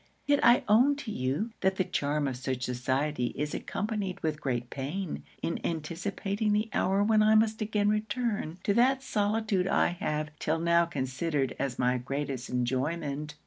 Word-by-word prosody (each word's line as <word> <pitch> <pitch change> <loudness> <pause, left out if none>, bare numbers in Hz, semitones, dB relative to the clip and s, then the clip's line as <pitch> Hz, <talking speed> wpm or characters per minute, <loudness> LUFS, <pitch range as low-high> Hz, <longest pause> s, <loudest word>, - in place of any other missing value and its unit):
Yet 285 0 +3
I 240 +1 +6
own 245 +7 +5
to 280 -6 -6
you, 140 - -1
that 190 0 +2
the 190 - +1
charm 150 -5 -1
of 130 - -2
such 130 0 -3
society 130 +1 -1
is 150 +1 -2
accompanied 205 -3 -3
with 155 -1 -1
great 120 -2 -2
pain, 155 +7 -4 0.2
in 165 - -1
anticipating 195 +6 -2
the 215 +2 0
hour 195 +2 +2
when 215 0 +4
I 215 +1 +5
must 220 0 +3
again 210 -1 +1
return 210 -5 -1
to 200 - +2
that 260 +4 +3
solitude 210 -4 0
I - - +3
have 150 -3 -2
'till 160 +1 0
now 170 +1 +3
considered 140 -1 -1
as 135 -3 -2
my 125 0 +2
greatest 135 0 -4
enjoyment.' 140 +4 -2
170 Hz, 165 wpm, -29 LUFS, 140-210 Hz, 0.2 s, I